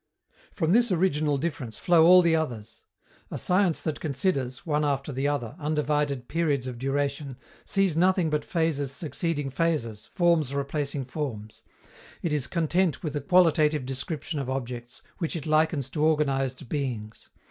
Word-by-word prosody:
From 160 -3 +1
this 235 +1 +4
original 155 -5 +1
difference 135 -6 -4
flow 170 -2 +5
all 180 0 +8
the 165 -1 +4
others. 120 -9 -4 0.4
A - - -5
science 180 -2 +2
that 155 -3 -2
considers, 135 -4 -2
one 150 -2 +1
after 140 0 -1
the 135 +1 -1
other, 140 -6 -2
undivided 150 -3 -1
periods 150 -6 0
of 125 -2 -6
duration, 140 0 -2 0.3
sees 195 -5 +1
nothing 180 -1 +3
but 150 -1 0
phases 155 -5 -1
succeeding 145 -1 -2
phases, 130 -8 -1
forms 165 -6 +2
replacing 140 -1 -2
forms; 125 -7 -5 0.6
it 165 - 0
is 145 -3 0
content 170 -1 0
with 155 -3 -3
a 145 - -1
qualitative 155 -6 +3
description 145 +4 -4
of 135 -2 -4
objects, 125 -2 -5 0.2
which 165 -2 -2
it 160 - -5
likens 155 -3 +2
to 150 - -1
organized 135 -5 +1
beings. 120 -6 -4
150 Hz, 150 wpm, -26 LUFS, 135-165 Hz, 0.6 s, all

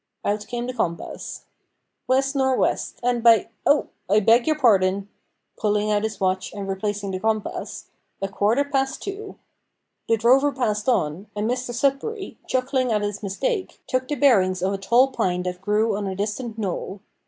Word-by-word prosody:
Out 210 +1 -1
came 240 -1 -3
the 255 - -4
compass. 170 -8 -4 0.6
"West 270 +2 +2
nor' 265 -1 +2
west, - - -1
and 245 -1 +1
by 230 -1 +5 0.2
Oh! 290 +1 +3 0.2
I 205 +2 +5
beg 230 +5 +4
your 310 -1 +2
pardon," 200 -6 +3 0.5
(pulling 210 0 +1
out 205 -1 +2
his 220 -2 -3
watch 185 0 0
and 200 -1 -5
replacing 200 +1 -2
the 185 - -3
compass), 220 0 -2 0.3
"a 195 - -1
quarter 210 +7 +1
past 270 -2 -1
two." 400 +1 -6 0.7
The 225 - +4
drover 260 +6 +4
passed 215 -3 -1
on, 180 -4 0
and 210 +1 -1
Mr 250 0 -2
Sudberry, 280 - -1
chuckling 255 -1 0
at 210 -1 +1
his 205 0 -3
mistake, 370 - -2
took 255 0 -1
the 295 - -1
bearings 185 -11 +3
of 190 +1 +1
a 195 - -3
tall 240 +7 +4
pine 180 -6 0
that 180 0 -4
grew 210 +2 +1
on 200 -1 -3
a 190 - -3
distant 215 +3 -3
knoll. 195 -1 -4
220 Hz, 175 wpm, -23 LUFS, 200-255 Hz, 0.7 s, by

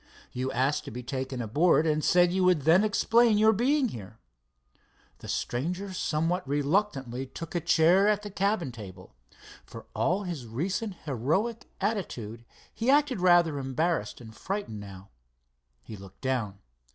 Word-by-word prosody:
You 130 +1 -3
asked 135 +4 0
to - - -6
be 125 +3 -7
taken 130 0 -4
aboard, 155 +8 +3
and 155 -1 +1
said 175 0 +4
you 190 0 +1
would 180 -6 +3
then 170 +7 +5
explain 225 +1 +3
your 220 +1 +5
being 260 +4 +2
here." 105 - -10 1.0
The - - -11
stranger 180 +10 -3
somewhat 165 0 -1
reluctantly 140 - -1
took 165 +5 -8
a 175 - 0
chair 175 +6 +4
at 210 -1 +1
the 205 - -7
cabin 195 -6 0
table. 95 -5 -11 0.5
For - - -11
all 185 +4 0
his 165 -10 -6
recent 185 - -3
heroic 160 - -1
attitude, 125 - -3 0.3
he 230 +3 -2
acted 285 -7 +3
rather 175 -5 +4
embarrassed 135 -3 -2
and 110 -2 -12
frightened 195 - -4
now. 95 -1 -11 0.7
He 110 - -9
looked 95 -1 -14
down. 120 -7 -2
160 Hz, 150 wpm, -28 LUFS, 125-195 Hz, 1.0 s, then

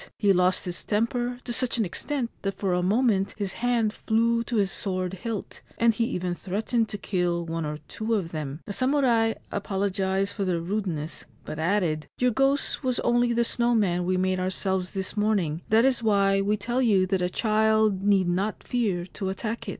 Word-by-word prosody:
He 200 -2 +4
lost 180 0 +2
his 175 -1 -4
temper 240 +3 -1
to 240 - -3
such 250 0 +1
an 225 - +1
extent 245 +7 -3
that 195 -1 -2
for 190 -2 -1
a 180 - +1
moment 200 0 +2
his 200 -2 -2
hand 235 -3 +1
flew 230 +1 +1
to 240 - -3
his 200 -3 +2
sword 185 -2 -1
hilt, 210 +2 -5 0.2
and 230 0 +4
he 230 - 0
even 180 -5 -2
threatened 220 +5 -1
to 205 - -4
kill 175 -3 -1
one 165 -1 -3
or 150 0 -4
two 225 +1 -2
of 175 -6 -2
them. 150 -1 -5
The 205 - -5
samurai 255 -3 +2 0.2
apologised 195 0 -1
for 200 - -2
their 180 -3 0
rudeness, 170 -4 -3 0.2
but 155 - -6
added: 165 -4 0
' - - -69
Your 250 0 +2
ghost 270 +5 +1
was 255 -2 0
only 240 0 +2
the 235 0 +2
snow 240 0 +1
man 180 -5 +1
we 185 +1 0
made 185 0 +1
ourselves 185 0 -1
this 190 +1 -3
morning. 200 -7 0
That 225 +3 +5
is 260 -3 +3
why 200 -3 +3
we 205 +2 +1
tell 240 +5 -1
you 200 -6 +4
that 190 0 0
a 180 - +1
child 215 -1 +2
need 195 -2 +3
not 190 +4 -1
fear 205 -8 -1
to 190 +1 -5
attack 225 +4 -4
it.' - - -3
200 Hz, 200 wpm, -26 LUFS, 185-230 Hz, 0.2 s, That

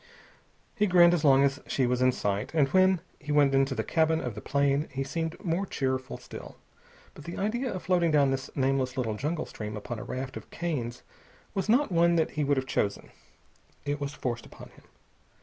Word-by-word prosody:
He 210 - +1
grinned 175 -2 +6
as 170 -3 0
long 135 -2 +6
as 140 0 +1
she 130 - +1
was 125 0 0
in 130 0 +5
sight, 105 +3 -2
and 145 -4 +4
when 185 +1 +4 0.2
he 150 - -6
went 145 -2 +4
into 135 0 +2
the - - -1
cabin 160 0 +2
of 125 -6 -4
the - - -8
plane 140 +1 +1
he 135 +1 -2
seemed 165 +4 -3
more 170 +3 0
cheerful 130 -7 -2
still. - - -10 0.6
But 150 - -13
the 170 - -6
idea 240 +6 -1
of 185 - -5
floating 175 -2 +2
down 145 -3 +4
this 135 0 -3
nameless 135 -1 0
little 115 -4 0
jungle 155 +8 -2
stream 105 0 -6
upon 110 +2 -6
a - - -6
raft 130 +1 -5
of - - -11
canes 130 -9 -4 0.5
was 195 +1 -2
not 250 +1 +3
one 170 0 +4
that 160 -2 +1
he 150 - -1
would 140 0 +2
have 130 - 0
chosen. 105 -6 -2 0.7
It 145 0 -2
was 140 +1 -4
forced 120 -2 -4
upon - - -13
him. - - -21
140 Hz, 205 wpm, -28 LUFS, 130-170 Hz, 0.7 s, grinned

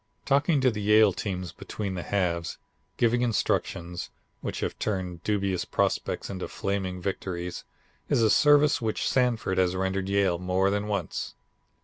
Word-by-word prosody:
Talking 145 +1 +3
to 130 -1 +4
the 105 -2 -4
Yale 105 -1 +5
teams 90 -3 -4
between 100 -3 -5
the 90 - -3
halves, 85 -3 -1 0.4
giving 120 +1 +3
instructions, 90 -6 -1 0.3
which - - -4
have - - -3
turned 90 -5 -2
dubious 100 -4 0
prospects - - -1
into 95 -2 -5
flaming 95 -2 -3
victories, 90 -2 -4 0.4
is 115 - +3
a 110 - +4
service 145 -1 +5
which 110 -2 -1
Sanford 120 -7 +1
has 90 0 +2
rendered 95 +1 -1
Yale 100 -3 +2
more 90 +2 +1
than 105 +1 -1
once. 100 -5 -3
100 Hz, 145 wpm, -27 LUFS, 90-110 Hz, 0.4 s, Yale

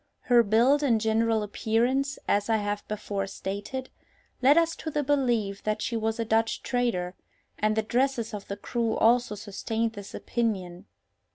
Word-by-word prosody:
Her 245 -2 +5
build 235 +7 +4
and 240 -6 +3
general 220 0 +1
appearance, 245 +7 0
as 205 +2 +1
I 225 - +4
have 205 0 -2
before 200 -2 -3
stated, 200 +7 -5 0.5
led 275 +4 +6
us 330 0 +3
to 315 - -5
the 295 -1 -1
belief 240 -8 +1
that 215 0 -1
she 235 - -2
was 225 0 -1
a 230 - 0
Dutch 225 +1 +1
trader, 230 -8 -1 0.5
and 215 0 +2
the 220 - +1
dresses 240 0 0
of 205 -1 -6
the 200 - -5
crew 230 +1 -1
also 235 -1 +3
sustained 225 +2 -3
this 205 -2 -9
opinion. 195 -6 -2
225 Hz, 165 wpm, -27 LUFS, 205-245 Hz, 0.5 s, led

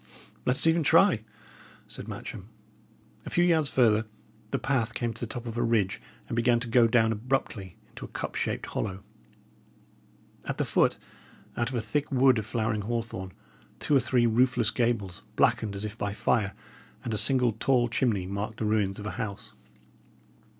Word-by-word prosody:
"Let 125 - +3
us - - -1
even 165 +1 +4
try," 165 - +5 0.7
said - - -8
Matcham. - - -7 0.7
A - - -7
few 175 - +2
yards 160 -5 +3
further, 110 -3 +3 0.4
the 135 - 0
path 125 -4 -1
came 120 -2 -1
to - - -13
the 120 - -2
top 120 +2 -6
of 115 -1 -5
a 120 - 0
ridge 115 -5 +1 0.3
and - - -3
began 120 0 +3
to 125 - -4
go 115 0 +5
down 115 -1 +3
abruptly 110 -5 -2
into - - -9
a - - -8
cup - - -5
shaped - - -2
hollow. 95 -2 -4 1.4
At - - -3
the - - 0
foot, - - +2 0.6
out 120 +1 0
of 130 - -5
a 120 - 0
thick 145 +8 -2
wood 130 -2 +4
of 110 - -6
flowering 110 -2 -1
hawthorn, 110 -4 -4 0.5
two 145 - +1
or - - +7
three 125 -1 +2
roofless 120 0 +3
gables, 115 -7 -1
blackened 105 -2 +2
as 100 +2 -3
if 105 0 -6
by 100 0 -2
fire, 100 -2 +1 0.5
and 115 - -3
a - - +1
single 125 +2 +3
tall 120 +2 +2
chimney 115 -5 0
marked 100 +3 -4
the 110 - -2
ruins 105 -2 +1
of 105 - -7
a 105 - -3
house. 100 -4 -6
115 Hz, 180 wpm, -28 LUFS, 105-125 Hz, 1.4 s, or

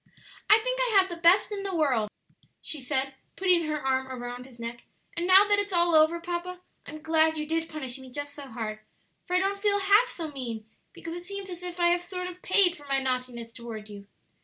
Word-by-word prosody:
"I 425 - +9
think - - -2
I 475 -5 +3
have 380 0 +2
the - - -3
best 350 +5 +5
in 405 -1 -3
the 390 -2 -3
world," 255 -10 +1 0.5
she 300 - -4
said, 265 +2 -1 0.2
putting 360 -3 +3
her 305 0 -1
arm 265 -1 0 0.2
round 245 +1 -6
his 240 -3 -17
neck; 235 +1 -6 0.3
"and 345 +1 -1
now 385 +2 +7
that 410 0 +3
it's 405 -1 -2
all 345 -1 +3
over, 315 +2 +5
papa, 350 +1 -4 0.3
I'm 310 0 -9
glad 320 0 +3
you 305 - -2
did 325 +1 -1
punish 270 -4 -6
me 260 -1 -11
just 290 +2 -5
so 285 -1 -9
hard; 220 -2 -5 0.5
for 360 - 0
I - - +5
don't 395 +1 -1
feel 405 -1 +3
half 405 +5 +5
so 330 -9 -6
mean, 235 -6 -5 0.3
because 330 - -8
it 350 0 -7
seems 395 0 -6
as 350 0 -7
if 355 0 -7
I 345 0 +4
have 350 0 +2
sort 360 +1 -5
of 360 0 -8
paid 370 -2 +4
for 290 - -15
my 275 0 +2
naughtiness 250 -3 -3
toward 225 -3 -8
you." 200 -1 -10
330 Hz, 230 wpm, -27 LUFS, 260-365 Hz, 0.5 s, I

